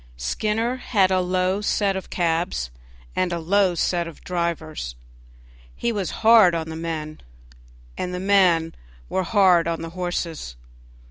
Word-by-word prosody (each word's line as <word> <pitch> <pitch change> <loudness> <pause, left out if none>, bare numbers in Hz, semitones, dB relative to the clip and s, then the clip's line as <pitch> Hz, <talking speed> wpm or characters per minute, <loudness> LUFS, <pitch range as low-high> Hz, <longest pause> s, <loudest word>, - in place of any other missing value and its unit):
Skinner 215 - -1
had 200 -7 +2
a 185 - +3
low 185 +2 0
set 205 -1 +1
of 190 - -6
cabs 165 - -1 0.4
and 185 -1 0
a 170 - -1
low 185 +2 +2
set 170 0 0
of 165 - -12
drivers; 165 - -3 0.8
he 235 - -1
was 200 -6 -2 0.2
hard 220 -6 +7
on 160 -1 -3
the 160 - -6
men, 160 -2 -5 0.8
and 180 - -2
the 180 - -4
men 180 -4 +3 0.4
were 190 - 0
hard 180 -3 +4
on 165 -1 -2
the 165 - -6
horses. 170 - -4
180 Hz, 145 wpm, -23 LUFS, 165-195 Hz, 0.8 s, hard